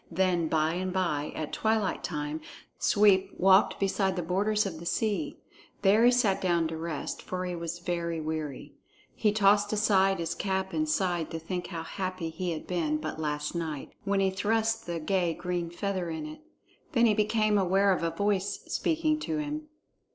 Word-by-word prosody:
Then 175 Hz, -1 st, +1 dB
by 155 Hz, 0 st, +1 dB
and 185 Hz, +1 st, -2 dB
by, 170 Hz, -6 st, -1 dB
at 155 Hz, -, -4 dB
twilight 220 Hz, -3 st, 0 dB
time, 150 Hz, -1 st, -3 dB, 0.4 s
Sweep 195 Hz, -2 st, +4 dB
walked 190 Hz, +1 st, +5 dB
beside 195 Hz, -1 st, +1 dB
the 175 Hz, -, -2 dB
borders 205 Hz, +5 st, +1 dB
of 170 Hz, -5 st, -4 dB
the 170 Hz, -, -9 dB
sea. 200 Hz, -9 st, -1 dB, 0.5 s
There 205 Hz, +4 st, +5 dB
he -, -, +8 dB
sat 230 Hz, -6 st, +2 dB
down 170 Hz, -3 st, +2 dB
to 160 Hz, -, -4 dB
rest, 160 Hz, -2 st, -4 dB
for 185 Hz, 0 st, -4 dB
he 180 Hz, -1 st, -3 dB
was 170 Hz, 0 st, -4 dB
very 170 Hz, -1 st, -2 dB
weary. 155 Hz, -3 st, -4 dB, 0.4 s
He 210 Hz, -, +2 dB
tossed 205 Hz, 0 st, +4 dB
aside 195 Hz, -2 st, +3 dB
his 165 Hz, -1 st, -2 dB
cap 190 Hz, -1 st, -2 dB
and 155 Hz, -1 st, 0 dB
sighed 175 Hz, -1 st, 0 dB
to 165 Hz, -, -4 dB
think 175 Hz, +2 st, -4 dB
how 165 Hz, -3 st, -5 dB
happy 185 Hz, -2 st, -4 dB
he 180 Hz, +3 st, -3 dB
had 160 Hz, -, -5 dB
been 160 Hz, -4 st, 0 dB
but 155 Hz, 0 st, -5 dB
last 150 Hz, -1 st, -2 dB
night, 160 Hz, -5 st, -4 dB
when 200 Hz, -1 st, +1 dB
he 190 Hz, -1 st, +2 dB
thrust 225 Hz, +3 st, 0 dB
the 170 Hz, -1 st, -2 dB
gay 175 Hz, 0 st, 0 dB
green 175 Hz, -1 st, -3 dB
feather 185 Hz, 0 st, -3 dB
in 160 Hz, -2 st, -4 dB
it. 155 Hz, 0 st, -9 dB, 0.5 s
Then 235 Hz, -3 st, +4 dB
he 220 Hz, -, +5 dB
became 215 Hz, 0 st, +2 dB
aware 195 Hz, +1 st, +3 dB
of 180 Hz, -, +1 dB
a 165 Hz, -, +1 dB
voice 200 Hz, +3 st, -1 dB
speaking 310 Hz, -1 st, +1 dB
to 315 Hz, 0 st, -2 dB
him. 300 Hz, 0 st, -4 dB
185 Hz, 185 wpm, -29 LUFS, 165-205 Hz, 0.5 s, he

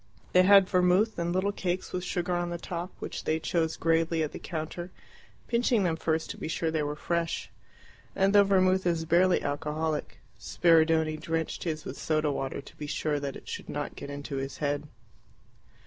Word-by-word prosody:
They 180 Hz, -, +7 dB
had 195 Hz, 0 st, +7 dB
vermouth 185 Hz, +3 st, +3 dB
and 170 Hz, 0 st, -1 dB
little 185 Hz, +3 st, +1 dB
cakes 185 Hz, -2 st, -3 dB
with 180 Hz, -, -2 dB
sugar 180 Hz, -1 st, -1 dB
on 175 Hz, 0 st, -1 dB
the 175 Hz, -, -3 dB
top, 175 Hz, +1 st, -5 dB
which -, -, -6 dB
they 160 Hz, +1 st, +1 dB
chose 160 Hz, -1 st, 0 dB
gravely 165 Hz, 0 st, +2 dB
at 150 Hz, -, -3 dB
the -, -, -7 dB
counter, 170 Hz, +2 st, -5 dB, 0.6 s
pinching 235 Hz, -2 st, +2 dB
them 170 Hz, -3 st, +1 dB
first 160 Hz, 0 st, -1 dB
to -, -, -9 dB
be -, -, -4 dB
sure 160 Hz, 0 st, -1 dB
they 160 Hz, -1 st, 0 dB
were 145 Hz, 0 st, -2 dB
fresh. 170 Hz, +1 st, -2 dB, 0.6 s
And 195 Hz, +1 st, +3 dB
though 205 Hz, 0 st, +8 dB
vermouth 190 Hz, -1 st, +3 dB
is 165 Hz, -2 st, 0 dB
barely 175 Hz, +3 st, +3 dB
alcoholic, 150 Hz, +2 st, -2 dB, 0.2 s
Spiridione 160 Hz, -2 st, +3 dB
drenched 165 Hz, +2 st, -3 dB
his 155 Hz, -2 st, -3 dB
with -, -, -6 dB
soda 155 Hz, -1 st, +1 dB
water 135 Hz, 0 st, -3 dB
to -, -, -15 dB
be 150 Hz, -, -6 dB
sure 150 Hz, 0 st, -1 dB
that 140 Hz, -1 st, -4 dB
it -, -, -11 dB
should -, -, -6 dB
not -, -, -4 dB
get -, -, -8 dB
into 145 Hz, 0 st, -5 dB
his 135 Hz, 0 st, -4 dB
head. 145 Hz, 0 st, -1 dB
165 Hz, 190 wpm, -28 LUFS, 155-180 Hz, 0.6 s, though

